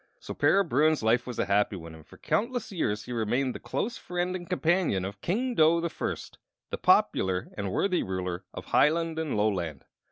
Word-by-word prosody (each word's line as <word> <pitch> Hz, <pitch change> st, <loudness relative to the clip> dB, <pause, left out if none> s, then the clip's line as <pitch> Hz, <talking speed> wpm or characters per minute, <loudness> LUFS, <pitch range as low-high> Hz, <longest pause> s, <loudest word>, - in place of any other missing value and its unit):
So -, -, -7 dB
Para 200 Hz, +1 st, +4 dB
Bruin's 155 Hz, -1 st, +2 dB
life 115 Hz, +3 st, +2 dB
was 125 Hz, -, -5 dB
a -, -, +1 dB
happy 100 Hz, +1 st, +2 dB
one, 85 Hz, -3 st, -9 dB
and 80 Hz, -1 st, -13 dB
for -, -, -17 dB
countless 245 Hz, +1 st, -1 dB
years 110 Hz, -, -1 dB
he -, -, -8 dB
remained 120 Hz, +3 st, 0 dB
the -, -, -7 dB
close 240 Hz, +4 st, -3 dB
friend 180 Hz, +1 st, -2 dB
and 175 Hz, -1 st, -7 dB
companion 170 Hz, -, +1 dB
of 100 Hz, +1 st, -7 dB
King 245 Hz, +8 st, -1 dB
Dough 165 Hz, -4 st, +4 dB
the 170 Hz, -1 st, -2 dB
First, -, -, -5 dB, 0.3 s
the -, -, -3 dB
popular 95 Hz, 0 st, +2 dB
and 100 Hz, -2 st, -3 dB
worthy 185 Hz, -, +1 dB
ruler 90 Hz, -2 st, -3 dB
of -, -, -8 dB
Hiland 165 Hz, +1 st, +2 dB
and 155 Hz, -8 st, -2 dB
Loland. 90 Hz, -9 st, -1 dB
135 Hz, 195 wpm, -28 LUFS, -, 0.3 s, Para